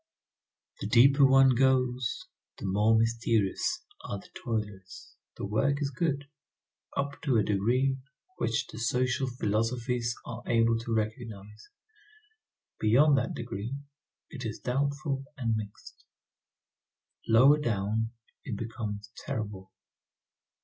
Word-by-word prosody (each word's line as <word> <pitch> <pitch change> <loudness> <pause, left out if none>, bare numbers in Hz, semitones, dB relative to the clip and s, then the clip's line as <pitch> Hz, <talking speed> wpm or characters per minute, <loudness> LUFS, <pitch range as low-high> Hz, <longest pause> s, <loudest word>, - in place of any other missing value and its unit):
The - - -3
deeper 135 +6 +6
one 135 0 +6
goes, 125 -1 +1 0.3
the - - -6
more 105 +4 +3
mysterious 115 - +1 0.2
are 100 - -4
the 100 - -14
toilers. 105 -5 -5 0.2
The - - -4
work 110 +8 +1
is 140 -2 -1
good, 145 0 -1 0.7
up 140 0 -2
to 130 -6 +2
a 105 - +4
degree 125 +7 +1 0.4
which 115 - 0
the - - -10
social 125 +3 +1
philosophies 120 +1 -1
are - - -6
able 115 0 +3
to 115 0 -2
recognize; 110 -1 -5 1.1
beyond 140 +7 +5
that 125 - -3
degree 115 +1 -4 0.6
it 130 -3 -7
is 110 -2 -4
doubtful 140 +1 -1
and 115 -4 0
mixed; 105 -1 -8 1.2
lower 130 +7 +6
down, 110 -3 0 0.3
it 110 -6 -4
becomes 105 -2 -5 0.2
terrible. 105 -8 -4
115 Hz, 115 wpm, -29 LUFS, 110-130 Hz, 1.2 s, deeper